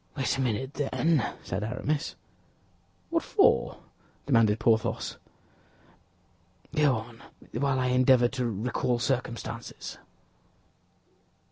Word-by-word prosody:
"Wait 135 - +1
a 135 - -1
minute, 130 +2 -1
then," 145 0 +1 0.2
said 95 +3 -3
Aramis. 130 +6 -2 1.0
"What 330 0 +2
for?" 405 - +2 0.4
demanded 115 -6 +4
Porthos. 110 0 +1 1.6
"Go 150 -4 +4
on, 115 +1 -8 0.3
while 135 +1 0
I 125 0 +1
endeavor 125 -1 +5
to 125 -2 -2
recall 120 +3 -1
circumstances." 120 -2 -4
125 Hz, 95 wpm, -28 LUFS, 115-135 Hz, 1.6 s, endeavor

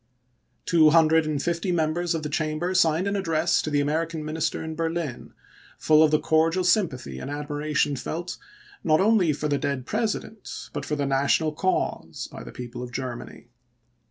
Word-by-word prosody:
Two 160 -3 +5
hundred 160 0 +4
and 150 -2 -1
fifty 170 +2 -1
members 170 +1 0
of 160 - -3
the - - -2
Chamber 155 +4 -1
signed 170 -1 +3
an 200 0 -1
address 165 -4 +1
to - - -3
the 145 -1 +2
American 160 +2 -1
minister 155 +1 -2
in 160 0 -5
Berlin, 165 -4 -3 0.5
full 155 0 +4
of 160 - +6
the 155 0 +3
cordial 165 +4 +2
sympathy 135 - 0
and - - -6
admira 150 +1 -4
tion 145 0 +2
felt, 165 +7 -5 0.4
not 155 0 +3
only 200 -5 +4
for 150 +1 -2
the 145 -1 0
dead 135 -2 -2
President, 220 - -4
but - - -4
for 150 - -1
the 145 -1 -1
national 140 +3 +2
cause, 185 +5 -2
by - - -8
the - - -9
people 120 - -7
of 125 -1 -6
Germany. 120 -1 -6
155 Hz, 180 wpm, -25 LUFS, 145-170 Hz, 0.5 s, of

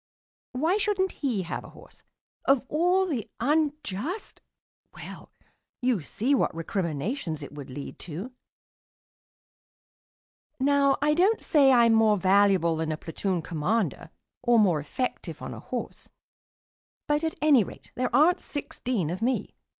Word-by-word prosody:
Why 320 +10 +1
shouldn't 395 -3 +1
he 240 -10 -2
have 170 - -5
a - - -11
horse? - - -16 0.4
Of 275 -2 +4
all 360 +5 +2
the 270 - -3
unjust 300 - -1 0.5
Well, - - -10 0.5
you 245 -6 +1
see 235 - -1
what 265 - +1
recriminations 165 - -3
it - - -9
would 145 -2 -9
lead 140 +2 -8
to. 180 +9 -6 2.3
Now 280 0 +3
I 300 0 +4
don't 385 +7 +2
say 280 -3 +5
I'm 235 -2 +5
more 220 -2 +4
valuable 190 -3 +3
than 160 0 -2
a 155 - -2
platoon 175 +2 -3
commander 170 - -1 0.3
or 240 -1 +4
more 185 -8 +4
effective 200 - -4
on - - -6
a - - -8
horse, - - -6 1.0
but, 295 +1 0
at 320 - -1
any 290 -7 +5
rate, - - -12
there 250 0 -1
aren't 330 +5 +4
sixteen 255 - -3
of 185 - -5
me. 250 +3 -1
240 Hz, 135 wpm, -27 LUFS, 180-295 Hz, 2.3 s, say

